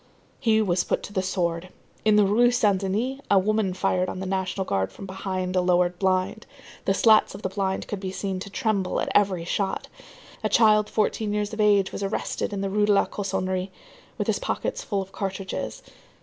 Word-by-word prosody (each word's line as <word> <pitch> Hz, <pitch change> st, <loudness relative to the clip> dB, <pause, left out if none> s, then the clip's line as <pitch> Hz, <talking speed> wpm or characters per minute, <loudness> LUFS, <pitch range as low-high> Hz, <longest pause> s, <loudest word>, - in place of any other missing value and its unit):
He 220 Hz, -3 st, +3 dB
was 180 Hz, -3 st, +1 dB
put -, -, -1 dB
to 205 Hz, -, -8 dB
the 190 Hz, -, +1 dB
sword. 175 Hz, -2 st, -2 dB, 0.3 s
In 215 Hz, -1 st, +4 dB
the 210 Hz, -1 st, +5 dB
Rue 230 Hz, +5 st, +4 dB
Saint 210 Hz, -6 st, +2 dB
Denis, 220 Hz, +8 st, -1 dB
a 200 Hz, -, +5 dB
woman 210 Hz, 0 st, +2 dB
fired 185 Hz, 0 st, +1 dB
on -, -, -5 dB
the 190 Hz, -, -4 dB
National 190 Hz, 0 st, -2 dB
Guard 95 Hz, -, -1 dB
from 195 Hz, -, -9 dB
behind 185 Hz, -1 st, -3 dB
a 185 Hz, -, +4 dB
lowered 180 Hz, 0 st, +2 dB
blind. 190 Hz, +3 st, 0 dB, 0.4 s
The 195 Hz, -, +2 dB
slats 220 Hz, 0 st, +4 dB
of -, -, -10 dB
the 190 Hz, -, -1 dB
blind 190 Hz, 0 st, -2 dB
could 205 Hz, -, -4 dB
be 190 Hz, -1 st, -4 dB
seen 190 Hz, -1 st, -3 dB
to 200 Hz, -, -7 dB
tremble 205 Hz, -4 st, 0 dB
at -, -, -1 dB
every 190 Hz, -4 st, +2 dB
shot. 195 Hz, +2 st, -2 dB, 0.5 s
A -, -, +1 dB
child 215 Hz, -2 st, +4 dB
fourteen 215 Hz, 0 st, 0 dB
years 210 Hz, 0 st, -2 dB
of 215 Hz, -, -1 dB
age 205 Hz, -2 st, +4 dB
was -, -, -5 dB
arrested 195 Hz, +1 st, -2 dB
in 200 Hz, -1 st, -3 dB
the 195 Hz, -, -1 dB
Rue 210 Hz, +1 st, +2 dB
de 210 Hz, -, +5 dB
la 200 Hz, -, +4 dB
Cossonerie, 190 Hz, -1 st, -2 dB, 0.5 s
with -, -, -1 dB
his -, -, 0 dB
pockets -, -, -3 dB
full 200 Hz, -2 st, -1 dB
of 190 Hz, -, -16 dB
cartridges. 195 Hz, -1 st, -4 dB
195 Hz, 205 wpm, -25 LUFS, 185-210 Hz, 0.5 s, the